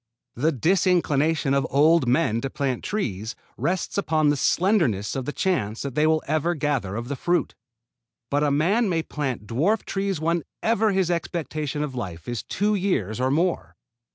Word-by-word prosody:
The 150 +7 +1
disinclination 160 - +2
of 140 0 +1
old 150 0 +4
men 120 -3 +2
to 135 - -3
plant 135 -3 -2
trees 110 - -3 0.2
rests 185 +2 -1
upon 155 -5 +2
the 145 - +3
slenderness 145 - +1
of 135 -2 -3
the 145 - -2
chance 115 - -1
that 140 -2 -4
they 150 +3 +3
will 155 0 +2
ever 155 +4 0
gather 140 -10 -1
of 120 +2 -4
the 140 - -3
fruit. 175 +6 0 0.8
But 145 +1 +2
a 150 - +3
man 190 +11 +2
may 165 -3 0
plant 130 -10 -4
dwarf 160 - 0
trees 195 -3 -2
whenever 185 +7 0
his 190 -2 +1
expectation 155 -3 -2
of 145 -3 -4
life 90 -9 -6
is 120 -2 -3
two 210 +1 0
years 180 - -1
or 130 +1 +1
more. 170 +6 0
150 Hz, 170 wpm, -24 LUFS, 130-175 Hz, 0.8 s, old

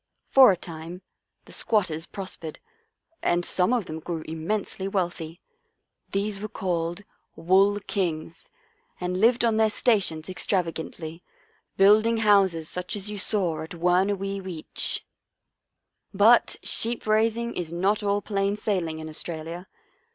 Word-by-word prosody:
For 265 -5 +8
a 185 - -1
time 170 +2 -9 0.4
the - - -14
squat 210 -4 +1
ters 160 0 -5
prospered 185 -5 -7 0.6
and 175 0 +1
some 180 +4 +2
of 240 -6 +1
them 155 0 -6
grew 160 0 -5
im 160 0 -6
mensely 200 -2 -1
wealthy. 175 -3 -3 0.7
These 200 0 -1
were 215 - -3
called 175 -4 -2
c 205 - -10 0.3
Wool 195 +5 +3
Kings 165 -5 -3 0.2
' - - -38
and 180 +1 -2
lived 235 +1 +4
on 225 -2 +2
their 220 0 +4
stations 200 -8 +1
extravagantly, 170 -3 -3 0.6
building 215 +4 +5
houses 195 -7 +3
such 180 +2 -3
as 205 +1 -4
you 205 - -5
saw 180 -7 0
at 160 +2 -8
Wuurna 180 +4 +2
wee 195 +1 -4
weetch. 180 -4 0 0.5
" - - -54
But 235 +1 +6
sheep 230 +1 -1
raising 225 +2 +1
is 170 -2 -4
not 195 +5 +1
all 205 0 0
plain 200 -1 0
sailing 180 -7 -2
in 155 0 -7
Australia. 165 +3 -6
190 Hz, 145 wpm, -25 LUFS, 165-210 Hz, 0.7 s, For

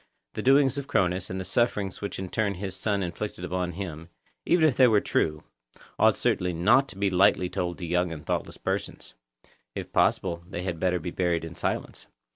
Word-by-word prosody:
The - - -4
doings 135 +1 +4
of 140 - -7
Cronus, 90 -8 0
and 95 - -4
the 95 - -4
sufferings 105 -5 0
which 100 - -4
in 95 - -4
turn 100 +1 -1
his 95 +1 -5
son 100 -2 -1
inflicted 90 +1 -5
upon 90 -1 -2
him, 85 -3 -6 0.4
even 165 -3 +5
if 135 - +1
they 130 - +6
were 110 -3 +4
true, 75 -5 -1 0.6
ought - - +5
certainly 90 -1 0
not 105 +11 +4
to 95 - -8
be 100 -1 +1
lightly 90 -1 +3
told 85 -1 -2
to 90 - -5
young 90 +1 0
and 75 -3 -8
thoughtless - - -2
persons; - - -4 0.6
if - - -6
possible, 85 -2 +1
they 90 -2 -5
had 90 -3 -3
better 90 0 +1
be 85 +1 -5
buried 85 -2 0
in 80 - -8
silence. - - -4
90 Hz, 200 wpm, -27 LUFS, 85-105 Hz, 0.6 s, they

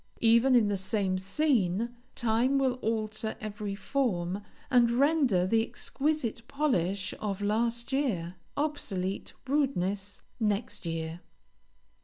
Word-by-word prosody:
Even 235 +3 +6
in 230 -4 +5
the 205 -1 0
same 190 -1 0
scene, 230 - +1 0.2
time 240 +4 +2
will 260 -2 +1
alter 220 0 -1
every 210 -1 -4
form, 200 -6 -1 0.3
and 245 -2 +5
render 260 - +3
the 225 +4 +3
exquisite 260 +1 -1
polish 200 - 0
of 200 -2 -2
last 230 +4 0
year, 215 -12 0 0.2
obsolete 205 -11 -2
rudeness 205 -9 -1 0.2
next 210 -4 -1
year. 165 0 -3
220 Hz, 110 wpm, -29 LUFS, 195-255 Hz, 0.3 s, Even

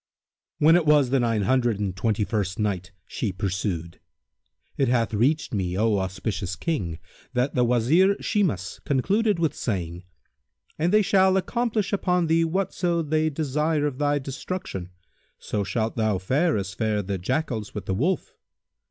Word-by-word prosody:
When 160 +3 +6
it 170 -3 +2
was 145 -4 +4
the 135 - +3
Nine 115 -4 +1
Hundred 120 -2 +2
and 100 -3 -2
Twenty 105 +2 0
first 100 -3 -2
Night, 95 -4 -2
She 110 - -3
pursued: 95 -3 -3 0.8
It 135 - +1
hath 115 -2 +1
reached 135 +9 +1
me, 90 -3 -1
O 110 -1 +2
auspicious 95 0 -3
King, 95 - -2 0.4
that 125 +3 0
the 125 - +2
Wazir 135 - +3
Shimas 170 - -1
concluded 205 - +1
with 160 -3 +1
saying, 90 - -3 0.7
"And 170 +3 +2
they 210 0 +5
shall 190 -1 +4
accomplish 220 0 -1
upon 180 -3 +1
thee 165 +1 +3
whatso 175 -1 0
they 155 +1 +1
desire 150 +1 0
of 140 -2 -3
thy 145 0 +2
destruction; 135 - -5 0.5
so 105 - -3
shalt 110 +2 -2
thou 110 -3 +1
fare 140 - +1
as 100 0 -4
fared 105 -3 -1
the 95 -1 -2
Jackals 120 - -2
with 100 -3 -5
the 95 - -1
Wolf." 155 - -1
125 Hz, 155 wpm, -25 LUFS, 100-160 Hz, 0.8 s, When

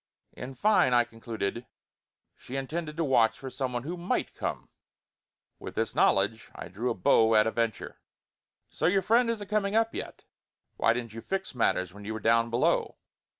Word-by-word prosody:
In 130 +2 -8
fine 200 - +3
I 120 - +5
concluded, 115 -1 -5 0.7
she 130 - -9
intended 150 +3 -4
to 165 - +1
watch 125 -6 +3
for 135 -1 -8
some 130 0 -3
one 120 -1 -3
who 170 +5 -5
might 175 +1 -2
come; - - -5 0.9
with - - -8
this 115 -2 -1
knowledge 105 +4 +2
I - - -8
drew 110 +7 -3
a - - -1
bow 110 +4 +4
at 105 - +5
a 110 - 0
venture: 115 -2 -3 0.7
"So - - 0
your 190 +2 +2
friend 230 +4 +3
isn't 215 -3 -3
coming 210 0 0
up 225 0 +2
yet? - - -7 0.5
Why 115 - +3
didn't 120 -2 -5
you 115 - -7
fix 190 +3 -4
matters 95 -7 0
when 105 +1 -11
you 110 +2 -4
were - - -4
down 115 +2 +3
below?" 120 +1 +1
120 Hz, 185 wpm, -28 LUFS, 115-170 Hz, 0.9 s, I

